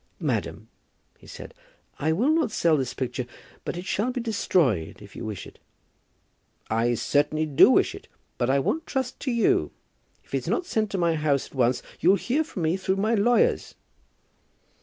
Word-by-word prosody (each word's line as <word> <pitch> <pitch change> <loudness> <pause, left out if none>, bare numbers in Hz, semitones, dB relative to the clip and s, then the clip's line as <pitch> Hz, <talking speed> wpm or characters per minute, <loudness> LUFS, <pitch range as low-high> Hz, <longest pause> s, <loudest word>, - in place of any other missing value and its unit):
"Madam," - - -2 0.5
he - - -17
said, - - -10 0.5
"I 155 +2 +1
will 235 - +2
not 315 -6 +2
sell 170 -6 +2
this 130 -4 -1
picture; 125 -1 -3 0.4
but - - -4
it 180 - -6
shall 215 +6 0
be 250 - -3
destroyed, 170 - 0
if 105 -1 -14
you - - -7
wish 110 -3 -5
it." - - -15 1.1
"I 115 +2 +2
certainly 150 +5 +1
do 145 -3 +6
wish - - +3
it, - - -11 0.3
but 120 - +1
I 135 - +3
won't 305 - -1
trust 260 -2 -3
to 265 - -2
you. 235 -1 +2 0.5
If - - -23
it's - - -2
not 365 - 0
sent 220 - -1
to 195 - -3
my 170 -2 +2
house 150 -3 +1
at - - -17
once 125 -2 +1 0.2
you'll 185 +4 +5
hear 255 - 0
from 295 - -6
me 160 +4 +1
through 190 0 -1
my 215 +4 +1
lawyers." 230 +3 +2
175 Hz, 180 wpm, -25 LUFS, -, 1.1 s, do